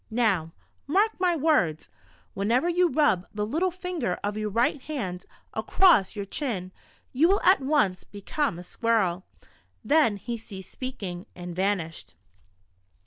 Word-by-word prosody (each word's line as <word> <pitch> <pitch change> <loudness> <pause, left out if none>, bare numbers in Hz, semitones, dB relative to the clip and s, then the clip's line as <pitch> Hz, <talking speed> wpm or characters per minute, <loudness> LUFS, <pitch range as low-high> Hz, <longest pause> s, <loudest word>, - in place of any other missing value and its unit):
Now, 210 -9 +1 0.4
mark 405 +9 +3
my 355 -2 +2
Avords: 270 - +1 0.4
Whenever 230 - +1
you 350 0 +3
rub 290 - +2
the 210 0 -1
little 325 - 0
finger 355 - -3
of 205 0 -2
your 215 0 -2
right 235 +6 +1
hand 200 -13 -5 0.3
across 340 - +4
your 200 -1 -4
chin, 195 -5 -3 0.4
you 295 +6 +4
will 395 +3 +3
at 375 -5 +5
once 265 -10 +1
become 205 - -3
a 175 - -8
squirrel." 190 -3 0 0.6
Then 260 -4 +3
he 235 +4 -5
ceased 195 -4 -10
speaking, 200 -9 -6
and 175 -1 -7
vanished 175 - -2
220 Hz, 140 wpm, -26 LUFS, 185-305 Hz, 0.6 s, at